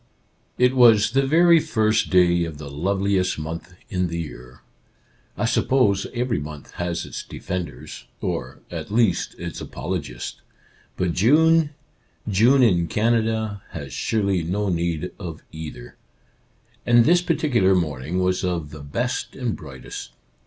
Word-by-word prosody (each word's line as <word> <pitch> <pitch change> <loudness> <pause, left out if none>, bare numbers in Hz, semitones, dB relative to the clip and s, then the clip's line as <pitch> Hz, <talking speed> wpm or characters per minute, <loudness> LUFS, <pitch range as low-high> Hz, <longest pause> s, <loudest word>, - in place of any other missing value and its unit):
It 125 +1 +3
was 110 -4 +6
the 135 +2 +2
very 170 +3 +6
first 110 -6 +1
day 85 -2 +4
of 80 -3 -5
the 70 -2 -8
loveliest 95 +4 0
month 80 +3 -6
in 90 -1 -1
the 85 0 -4
year. 65 -6 -9 0.8
I - - 0
suppose 105 -7 +2
every 125 -3 -1
month 75 -1 -8
has 85 -1 -3
its - - -6
defenders, 90 -8 -6
or, 60 - -4
at - - -5
least, 110 -4 +1
its - - -6
apologists, 75 -9 -5 0.6
but 90 -2 0
June 160 - +4 0.3
— - - -41 0.3
June 120 +7 +4
in 90 -7 +3
Canada 110 -1 0
— - - -26
has 70 -1 -7
surely 100 -5 0
no 100 +5 -1
need 85 0 -1
of 85 -5 -7
either. 80 -6 -9 0.9
And 120 -1 +5
this 175 +2 +5
particular 125 - +2
morning 80 -1 -2
was 90 +1 0
of 85 -5 -2
the 75 - -9
best 115 - -3
and 125 -5 -2
brightest. 65 -4 -9
95 Hz, 140 wpm, -23 LUFS, 85-115 Hz, 0.9 s, was